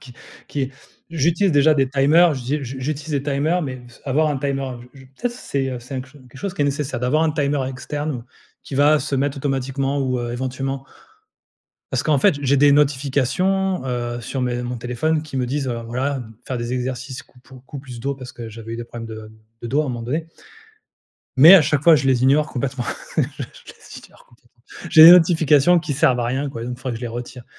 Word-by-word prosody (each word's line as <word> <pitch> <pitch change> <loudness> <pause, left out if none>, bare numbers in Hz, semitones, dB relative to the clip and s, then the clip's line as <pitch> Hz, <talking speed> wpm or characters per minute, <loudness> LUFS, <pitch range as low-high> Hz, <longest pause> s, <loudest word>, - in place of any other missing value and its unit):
qui 125 -2 -14 0.3
qui 135 -2 -3 0.4
j'utilise 165 +4 +1
déjà 150 +2 +5
des 135 -2 +1
timers, 145 +5 +4
j'ai 135 +3 -3
j'u 130 +1 -6
j'utilise 150 +3 -4
des 140 -2 -1
timers, 150 +5 0
mais 130 -3 -6
s 120 - -19
avoir 150 +3 +1
un 145 - -1
timer, 135 -1 -2 0.2
je 135 - -14
je 130 - -14
peut-être 235 - -4
c'est, 140 - -3
heu, 125 -1 -5
c'est 125 +3 -9
un - - -2
cl 130 +2 -12 0.2
quelque 130 - -14
chose 195 +4 -4
qui 145 - 0
est - - +2
nécessaire, 140 -3 -2
d'avoir 150 +6 +2
un 155 - +1
timer 140 -3 0
externe, 135 0 -5 0.4
qui 135 - -7
va 145 +2 +5
se 140 0 -2
mettre 140 +1 -1
automatiquement 135 0 -2
ou, 130 -2 -1
heu, 120 0 -4
éventuellement. 130 +2 -4 1.1
Parce - - 0
qu'en 150 -3 +2
fait, 140 - +3
j'ai 140 0 +2
des 145 +1 +5
notifications, 145 +6 +1
heu, 120 -1 -3
sur 130 +3 -4
mes 125 0 -1
mon 125 0 -4
téléphone 125 +7 -1
qui 145 -3 -8
me 125 -1 0
disent, 135 +1 -2
heu, 120 -1 -3
voilà 135 +4 -2
m 115 -3 -8
faire 130 -2 -3
des 120 +1 -4
exercices 130 +1 -4
coupo 130 0 -18
cou 145 - -8
plus 125 -3 -10
dos 140 +3 -2
parce 130 -2 -10
que 115 -2 -8
j'avais 115 +1 -9
eu - - -4
des 120 - -6
problèmes 115 -1 -8
de 110 0 -8
mmh, 110 - -19 0.2
de - - -4
dos, 140 +5 +1
à - - -4
un - - -4
moment 120 -2 -4
donné 155 +7 -3 1.1
mais 160 +8 +10
à 175 - +8
chaque 145 -1 0
fois 165 -1 +7
je 140 -2 -1
les 130 -2 +2
ignore 145 +3 +4
complètement, 130 -1 -3 0.3
je - - +4 0.2
les - - -12
ignore - - -22
complètement. 120 0 -28 0.3
J'ai 160 - +8
des 170 - +12
notifications 165 -1 +5
qui 155 -3 -4
servent 130 -2 +2
à - - -1
rien 135 +4 -2
quoi, 115 -4 -7
même 125 +1 -4
il - - -6
faudrait 130 0 -5
que - - -4
je - - -12
les - - -2
retire. 120 +1 -8
135 Hz, 230 wpm, -21 LUFS, 125-150 Hz, 1.1 s, des